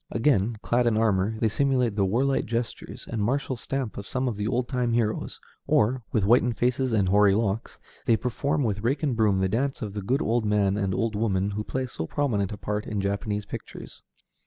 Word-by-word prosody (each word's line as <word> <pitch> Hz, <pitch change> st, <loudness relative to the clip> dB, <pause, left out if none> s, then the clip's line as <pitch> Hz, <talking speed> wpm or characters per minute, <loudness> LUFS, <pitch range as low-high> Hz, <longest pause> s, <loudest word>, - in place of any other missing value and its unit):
Again, 115 Hz, -3 st, +1 dB
clad 120 Hz, 0 st, +2 dB
in 110 Hz, -2 st, +2 dB
armor, 110 Hz, -1 st, +1 dB
they 115 Hz, -, +2 dB
simulate 125 Hz, -1 st, +1 dB
the 100 Hz, -2 st, +2 dB
warlike 130 Hz, +7 st, +1 dB
gestures 115 Hz, -1 st, -4 dB
and 115 Hz, -2 st, -3 dB
martial 130 Hz, +5 st, 0 dB
stamp 130 Hz, -1 st, -4 dB
of 100 Hz, -, -8 dB
some 130 Hz, 0 st, -1 dB
of 120 Hz, -, -1 dB
the 105 Hz, +1 st, -2 dB
old 120 Hz, +1 st, 0 dB
time 125 Hz, -3 st, 0 dB
heroes; 115 Hz, -2 st, -1 dB, 0.3 s
or, 125 Hz, +5 st, +2 dB
with 110 Hz, -, +1 dB
whitened 120 Hz, +2 st, +3 dB
faces 125 Hz, +3 st, +1 dB
and 100 Hz, -4 st, +2 dB
hoary 100 Hz, 0 st, +5 dB
locks, 110 Hz, 0 st, -1 dB, 0.3 s
they 115 Hz, -, +5 dB
perform 140 Hz, +5 st, -1 dB
with 105 Hz, -4 st, -1 dB
rake 135 Hz, +7 st, 0 dB
and 140 Hz, -5 st, +1 dB
broom 105 Hz, -4 st, +2 dB
the 95 Hz, -, +2 dB
dance 130 Hz, +7 st, -1 dB
of 105 Hz, -2 st, -5 dB
the 105 Hz, -, -4 dB
good 125 Hz, +8 st, 0 dB
old 115 Hz, +1 st, +1 dB
man 105 Hz, -2 st, +2 dB
and 100 Hz, -3 st, -1 dB
old 115 Hz, -2 st, -1 dB
woman 100 Hz, -2 st, 0 dB
who 105 Hz, +1 st, -3 dB
play 130 Hz, +4 st, -3 dB
so 80 Hz, -10 st, -5 dB
prominent 105 Hz, -, 0 dB
a 105 Hz, -, -5 dB
part 105 Hz, +1 st, -3 dB
in 105 Hz, -, -2 dB
Japanese 100 Hz, +1 st, -2 dB
pictures. -, -, -9 dB
110 Hz, 210 wpm, -26 LUFS, 100-125 Hz, 0.3 s, hoary